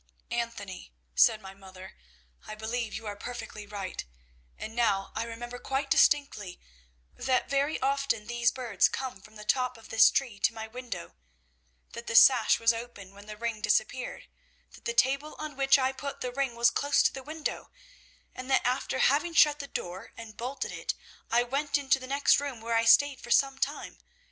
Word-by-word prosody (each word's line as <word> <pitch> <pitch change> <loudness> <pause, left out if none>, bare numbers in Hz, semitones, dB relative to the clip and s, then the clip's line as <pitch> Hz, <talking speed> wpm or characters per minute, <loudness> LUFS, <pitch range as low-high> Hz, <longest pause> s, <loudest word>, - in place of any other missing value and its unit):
"'Anthony,' 230 - -4 0.2
said 215 - +4
my 190 0 -9
mother, 190 -1 -13 0.5
'I 215 - -6
believe 220 +1 -3
you 225 - -7
are 205 -1 -4
perfectly 215 -2 -8
right, 200 -2 -5 0.5
and 220 - -7
now 210 -5 +1
I 225 - -2
remember 240 +1 -7
quite 275 +2 -3
distinctly 245 -11 +2 0.6
that 260 0 0
very 280 +3 +1
often 275 -5 0
these 240 +1 +1
birds 235 -7 +1
came 255 -7 -5
from 215 +2 -17
the 210 0 -10
top 250 +1 +1
of 225 - -15
this 225 0 +7
tree 240 -7 -2
to 225 - +1
my 220 0 -6
window, 230 - -7 0.8
that 235 - -9
the 230 - -2
sash 245 -2 +7
was 230 0 +4
open 230 -5 -9
when 200 +1 -14
the 210 0 -8
ring 230 -1 -3
disappeared, 225 +4 -1 0.4
that - - -17
the 485 - -2
table 285 - +1
on 305 -2 -6
which 275 +1 +4
I 260 -1 +1
put 280 +1 -7
the 250 - -3
ring 265 -2 -2
was 235 0 +4
close 285 0 +2
to - - +2
the 265 - -6
window, 310 +3 -5 0.6
and 255 +1 -8
that, 265 - +3
after 255 +1 0
having 305 +6 +2
shut 295 -1 +5
the 280 - -6
door 185 -2 -6
and 225 -2 -10
bolted 255 +4 -4
it, - - -3 0.3
I 240 +1 +3
went 280 +4 0
into 270 -1 +2
the 255 - -9
next 280 +2 +3
room, 280 -4 -5
where 230 +1 -3
I 230 0 +2
stayed 280 +4 +5
for - - -11
some 270 +2 +3
time. 285 +3 -3
240 Hz, 190 wpm, -29 LUFS, 220-275 Hz, 0.8 s, this